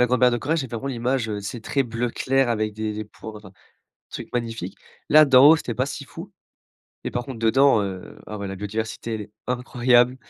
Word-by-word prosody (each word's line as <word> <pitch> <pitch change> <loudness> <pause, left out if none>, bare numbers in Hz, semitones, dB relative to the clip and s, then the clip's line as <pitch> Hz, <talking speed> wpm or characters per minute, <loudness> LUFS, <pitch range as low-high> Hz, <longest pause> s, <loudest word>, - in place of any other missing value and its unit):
grande 125 0 +1
barrière 125 -1 +5
de 120 - 0
corail, 155 +7 0
j'ai 135 -4 -1
vraiment 120 +3 -5
l'image, 125 -1 -1
heu, 105 -1 -3
tu 100 - -7
sais, 120 - -5
très 135 +5 0
bleu 120 0 -2
clair 135 +1 +1
avec 110 -2 0
des 110 0 -3
des 110 0 -5
points, 110 +1 -10
heu 95 - -11 0.6
truc - - -7
magnifique. 115 -2 -4 0.3
Là, 155 +1 +8
d'en 135 +1 +8
haut, 165 - +7
c'était 125 -6 -4
pas 130 +4 0
si 140 0 -6
fou. - - -10 0.7
Et - - -2
par 120 0 -3
contre 130 -3 -7
dedans, 115 0 +4
heu, 95 -2 -6
ah 105 - -6
ouais, 100 -1 -4
la 95 - -5
biodiversité, 110 +3 -4
elle 110 - -4
est 105 - -13 0.2
incroyable. 125 0 +2
120 Hz, 225 wpm, -23 LUFS, 110-130 Hz, 0.7 s, Là